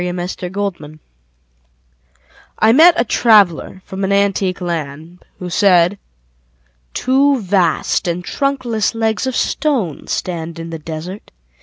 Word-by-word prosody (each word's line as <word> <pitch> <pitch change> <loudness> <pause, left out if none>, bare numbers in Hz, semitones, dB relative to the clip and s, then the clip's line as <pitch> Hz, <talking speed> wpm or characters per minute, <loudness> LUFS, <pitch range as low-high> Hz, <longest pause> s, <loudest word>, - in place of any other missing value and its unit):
Y - - -2
Z 180 0 -4
Ozymandias 175 -7 -4 1.6
I 220 - +4
MET 335 +5 +7
a 235 - +2
traveller 205 -5 +3
from 190 +1 -6
an 195 - 0
antique 200 -2 +1
land 165 -1 -5
Who 180 -1 -7
said: 180 0 +3 1.0
Two 270 +1 +2
vast 185 -4 0
and 175 +1 -2
trunkless 245 -6 -1
legs 225 +2 -1
of 260 - -2
stone 245 - -1
Stand 170 -2 -4
in 165 0 -7
the 165 - -6
desert 165 +6 -8
190 Hz, 125 wpm, -17 LUFS, 170-220 Hz, 1.6 s, MET